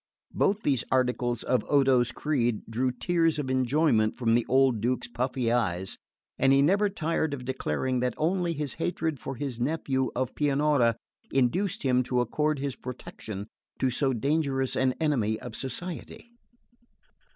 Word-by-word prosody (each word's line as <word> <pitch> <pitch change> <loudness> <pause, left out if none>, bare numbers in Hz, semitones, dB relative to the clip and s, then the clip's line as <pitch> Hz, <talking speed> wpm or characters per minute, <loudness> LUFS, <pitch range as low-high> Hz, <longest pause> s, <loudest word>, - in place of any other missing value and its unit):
Both 205 +2 +1
these 135 -4 +1
articles 125 -2 +1
of 125 - +1
Odo's 130 -4 +4
creed 120 -7 0
drew 125 +3 0
tears 165 +5 +1
of 135 -3 -2
enjoyment 130 -4 +2
from 115 -3 +1
the 120 0 +2
old 130 -4 +3
Duke's 120 +1 0
puffy 125 0 -1
eyes; 95 -6 -1 0.4
and 135 +1 +4
he 135 - +5
was - - +5
never 200 +5 +3
tired 160 -4 -1
of 125 -2 -9
declaring 130 0 -1
that 125 0 -1
only 175 +1 0
his 150 -3 -3
hatred 160 -3 -2
for 135 - -5
his 125 -2 -4
nephew 130 -1 0
of 130 0 -1
Pianura 145 -5 +2 0.4
induced 150 +10 +1
him 125 -2 +3
to 125 0 0
accord 150 +5 0
his 140 -1 -3
protection 110 -5 -7 0.3
to 130 - +1
so 135 +2 +1
dangerous 135 +1 0
an 130 -1 +1
enemy 120 -9 +1
of 110 - -8
society. 175 - -5
130 Hz, 155 wpm, -27 LUFS, 120-150 Hz, 0.4 s, he